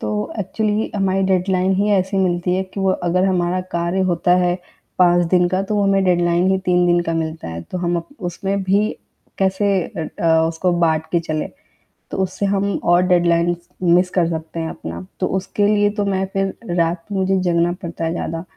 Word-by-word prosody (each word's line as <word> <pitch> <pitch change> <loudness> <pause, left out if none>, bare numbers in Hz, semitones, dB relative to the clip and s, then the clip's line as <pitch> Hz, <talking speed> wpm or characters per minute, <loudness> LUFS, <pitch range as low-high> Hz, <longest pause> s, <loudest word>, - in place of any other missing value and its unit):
तो 105 - -3 0.3
एक्चुअली 210 +2 -1
हमारी 195 -1 +1
डेडलाइन 185 0 +1
ही 200 +2 +1
ऐसी 195 -1 +1
मिलती 180 -1 +1
है 190 - 0
कि 200 - -3
वो 190 - +2
अगर 180 +2 +1
हमारा 180 -1 +1
कार्य 170 +2 0
होता 175 +1 +2
है 180 -1 +2 0.4
5 175 -1 +4
दिन 180 0 +3
का 185 +2 0
तो 205 +2 -3
वो 205 - +2
हमें 195 0 +3
डेडलाइन 175 0 +2
ही 190 - +2
3 180 -1 +3
दिन 175 0 +3
का 165 -1 -2
मिलता 160 - -3
है। 85 +1 -6
तो 185 - -6
हम 175 -1 0
अप 170 - -5 0.2
उसमें 195 +3 -2
भी 200 +3 +2 0.5
कैसे 190 +1 +1 0.3
अ 160 - -3 0.2
अ, 160 -1 +4
उसको 170 +2 0
बाँट 160 -1 +1
के 170 - +3
चले। 155 -2 -3 0.7
तो - - -4
उससे 190 +2 -3
हम 200 0 +1 0.2
और 175 - +5
डेडलाइनस 175 -1 +2 0.2
मिस 180 +1 +4
कर 170 -2 +4
सकते 160 0 -5
हैं 160 0 -2
अपना। 85 +2 -7
तो - - +1
उसके 200 +2 0
लिए 205 0 +3
तो 205 - +1
मैं 190 -1 0
फ़िर 195 0 -3
रात 165 0 0
में 195 - -1
मुझे 190 0 +1
जगना 170 -1 +2
पड़ता 165 -1 -4
है 165 - -1
ज़्यादा। 165 -1 -4
180 Hz, 205 wpm, -20 LUFS, 170-195 Hz, 0.7 s, और